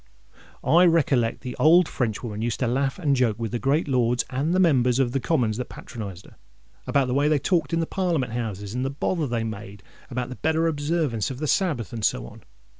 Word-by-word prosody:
I 175 +3 +5
recollect 140 -9 +2
the 125 -1 -6
old 170 +2 +5
Frenchwoman 110 -2 -3
used 115 0 -2
to 125 - +2
laugh 135 +3 0
and 150 -7 +1
joke 120 -5 +1
with 115 -2 -4
the 120 - -2
great 140 +6 +1
Lords 125 -2 +1
and 140 +5 -1
the 185 - +2
Members 130 -9 +3
of 130 -3 +1
the 135 - 0
Commons 120 -7 0
that 125 - -4
patronised 100 -5 -8
her, - - -18 0.5
about 140 -2 +2
the 125 - -1
way 140 +2 +2
they 150 0 +3
talked 155 0 0
in 165 0 +1
the - - 0
Parliament 165 -10 -1
Houses, 105 -4 -4
and 125 +1 -2
the 135 - -1
bother 150 +3 -1
they 120 -2 -1
made 100 -3 -7 0.3
about 125 -1 -3
the 125 - -7
better 160 +1 +1
observance 150 -7 0
of 130 - -6
the 155 - -3
Sabbath, 150 - 0
and 115 -2 -5
so - - +1
on. - - -12
130 Hz, 220 wpm, -24 LUFS, 115-155 Hz, 0.5 s, I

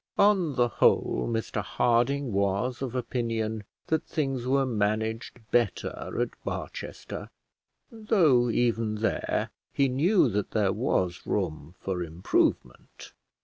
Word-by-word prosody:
On 190 -8 +4
the 120 -1 +3
whole 115 - +2
Mr 115 -1 -2
Harding 120 +2 +1
was 100 +6 0
of 130 -2 -3
opinion 115 -3 -2 0.2
that 160 0 0
things 135 -5 -2
were 135 +1 +3
managed 110 +1 -1
better 120 -5 +1 0.3
at - - +1
Barchester, - - -6 0.6
though 175 - +3
even 115 -2 +1
there 110 +1 -1 0.2
he 140 - +2
knew 170 +10 +3
that 105 0 -1
there 100 -3 +1
was 95 -7 -1
room 80 -4 -2
for 95 -2 -3
improvement. 85 +1 -1
115 Hz, 115 wpm, -27 LUFS, 105-135 Hz, 0.6 s, On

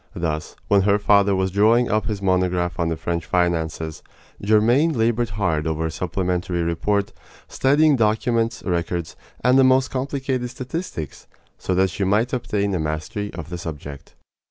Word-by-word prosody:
Thus, 80 -2 -3
when 100 -1 +4
her 100 +1 +3
father 100 -1 +3
was 95 0 0
drawing 110 +5 +3
up 110 +1 0
his 105 -3 -3
monograph 90 -2 0
on 85 -1 +1
the 80 - -2
French 85 +1 -3
finances, 80 -3 -1 0.4
Germaine 115 +10 +3
labored 115 +1 +1
hard 80 -6 0
over 80 0 -1
a 80 - -2
supplementary 90 0 -2
report, 100 +5 -1 0.3
studying 145 +2 +3
documents, 115 +1 0
records, 85 -2 -2 0.3
and 125 +1 +5
the - - +6
most 130 0 +3
complicated 130 -2 -2
statistics, 130 - -6 0.3
so 95 - -1
that 95 0 +2
she 100 - -3
might 105 +6 +1
obtain 100 -5 -1
a 90 - 0
mastery 80 +7 -3
of 80 - -8
the 85 - -4
subject. 70 -4 -8
100 Hz, 155 wpm, -22 LUFS, 85-115 Hz, 0.4 s, the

